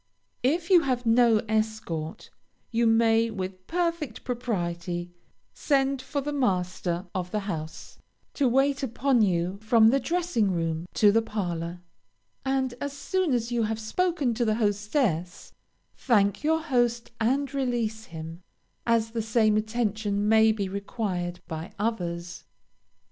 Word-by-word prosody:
If 330 Hz, +8 st, 0 dB
you 355 Hz, -2 st, +8 dB
have 255 Hz, -4 st, -1 dB
no 230 Hz, -1 st, +5 dB
escort, 215 Hz, -8 st, -2 dB, 0.4 s
you 235 Hz, 0 st, +2 dB
may 225 Hz, 0 st, +4 dB
with 185 Hz, -3 st, -6 dB
perfect 335 Hz, -8 st, -2 dB
propriety 175 Hz, -7 st, -3 dB, 0.4 s
send 275 Hz, -2 st, +1 dB
for 280 Hz, +2 st, -3 dB
the 295 Hz, +2 st, -3 dB
master 180 Hz, -7 st, -1 dB
of 180 Hz, -1 st, -3 dB
the 210 Hz, +2 st, -2 dB
house, 160 Hz, -5 st, -6 dB, 0.3 s
to 280 Hz, -, +2 dB
wait 270 Hz, +3 st, +2 dB
upon 265 Hz, 0 st, +1 dB
you 185 Hz, -1 st, +1 dB
from 220 Hz, 0 st, +5 dB
the 275 Hz, +4 st, +3 dB
dressing 335 Hz, -, 0 dB
room 165 Hz, -1 st, -2 dB
to 205 Hz, -1 st, +6 dB
the 225 Hz, +2 st, +3 dB
parlor, 175 Hz, -5 st, -4 dB, 0.6 s
and 265 Hz, -2 st, 0 dB
as 285 Hz, 0 st, -3 dB
soon 365 Hz, +3 st, -1 dB
as 235 Hz, 0 st, -2 dB
you 240 Hz, -1 st, +1 dB
have 220 Hz, 0 st, -1 dB
spoken 285 Hz, +3 st, 0 dB
to 240 Hz, +2 st, 0 dB
the 215 Hz, -2 st, +2 dB
hostess, 205 Hz, -, -1 dB, 0.4 s
thank 200 Hz, -5 st, +2 dB
your 320 Hz, +1 st, +2 dB
host 240 Hz, -5 st, 0 dB
and 270 Hz, +5 st, +1 dB
release 235 Hz, -5 st, -1 dB
him, 165 Hz, +1 st, -8 dB, 0.5 s
as 225 Hz, -1 st, +2 dB
the 230 Hz, -1 st, -2 dB
same 220 Hz, -1 st, +2 dB
attention 215 Hz, -2 st, -1 dB
may 220 Hz, 0 st, +6 dB
be 205 Hz, -3 st, -2 dB
required 190 Hz, -3 st, -3 dB
by 160 Hz, -1 st, -6 dB
others. 175 Hz, -5 st, -3 dB
220 Hz, 140 wpm, -27 LUFS, 185-255 Hz, 0.6 s, you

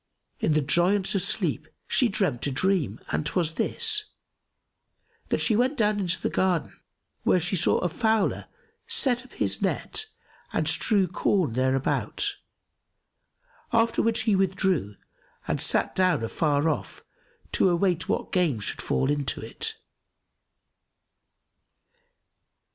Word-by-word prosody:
In 155 Hz, -, +1 dB
the 155 Hz, -, +3 dB
joyance 180 Hz, +7 st, +2 dB
of 195 Hz, -, +1 dB
sleep, 200 Hz, -, 0 dB, 0.2 s
she 250 Hz, -, +3 dB
dreamt 185 Hz, -, -1 dB
a -, -, -1 dB
dream 145 Hz, -, 0 dB
and -, -, 0 dB
'twas 160 Hz, +1 st, -1 dB
this, 425 Hz, -, 0 dB, 1.2 s
that -, -, 0 dB
she 220 Hz, -, +3 dB
went 255 Hz, +6 st, +1 dB
down 210 Hz, -1 st, +2 dB
into 180 Hz, -2 st, -1 dB
the -, -, -1 dB
garden, 180 Hz, -4 st, 0 dB, 0.5 s
where 185 Hz, -, +3 dB
she 180 Hz, +3 st, -1 dB
saw 170 Hz, -, +3 dB
a -, -, 0 dB
fowler 220 Hz, +3 st, 0 dB, 0.4 s
set 270 Hz, -, +2 dB
up 255 Hz, -, -18 dB
his -, -, 0 dB
net 435 Hz, -, -1 dB, 0.5 s
and -, -, 0 dB
strew 200 Hz, -4 st, +2 dB
corn 180 Hz, -, 0 dB
thereabout, 130 Hz, +2 st, 0 dB, 1.3 s
after 230 Hz, -1 st, +2 dB
which 230 Hz, +2 st, +1 dB
he 220 Hz, -4 st, +2 dB
withdrew 190 Hz, -, 0 dB, 0.5 s
and -, -, 0 dB
sat -, -, +1 dB
down 185 Hz, -9 st, +2 dB
afar 145 Hz, +5 st, 0 dB
off 155 Hz, -5 st, -3 dB, 0.5 s
to 190 Hz, -, +3 dB
await 175 Hz, 0 st, 0 dB
what -, -, -1 dB
game 170 Hz, -, +1 dB
should 105 Hz, -, -2 dB
fall 135 Hz, -, 0 dB
into 145 Hz, -2 st, -1 dB
it. 450 Hz, -1 st, -5 dB
185 Hz, 130 wpm, -26 LUFS, 155-220 Hz, 1.3 s, the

